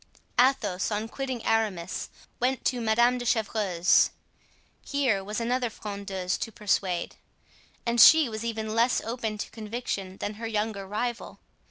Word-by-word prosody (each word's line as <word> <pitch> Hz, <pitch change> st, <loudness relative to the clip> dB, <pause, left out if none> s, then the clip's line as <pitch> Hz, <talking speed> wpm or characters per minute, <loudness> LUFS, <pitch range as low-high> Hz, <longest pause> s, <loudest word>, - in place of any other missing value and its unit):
Athos, 235 Hz, -8 st, +2 dB
on 215 Hz, +1 st, -2 dB
quitting 260 Hz, -1 st, -5 dB
Aramis, 205 Hz, -6 st, -1 dB, 0.3 s
went 255 Hz, 0 st, 0 dB
to 250 Hz, -2 st, +1 dB
Madame 235 Hz, +3 st, +3 dB
de -, -, -4 dB
Chevreuse. 205 Hz, -6 st, +3 dB, 0.7 s
Here 260 Hz, -9 st, 0 dB
was 210 Hz, +3 st, -4 dB
another 245 Hz, +1 st, 0 dB
frondeuse 200 Hz, -4 st, -4 dB
to 225 Hz, -, -4 dB
persuade, 195 Hz, -4 st, -1 dB, 0.7 s
and 235 Hz, 0 st, +3 dB
she 315 Hz, +3 st, +9 dB
was 220 Hz, -1 st, -5 dB
even 220 Hz, -2 st, -3 dB
less 235 Hz, +2 st, +3 dB
open 225 Hz, -2 st, -3 dB
to -, -, -5 dB
conviction 210 Hz, -4 st, -5 dB
than 205 Hz, -, -3 dB
her 230 Hz, -, -2 dB
younger 210 Hz, -2 st, -2 dB
rival. 235 Hz, +4 st, -3 dB
220 Hz, 140 wpm, -27 LUFS, 205-240 Hz, 0.7 s, she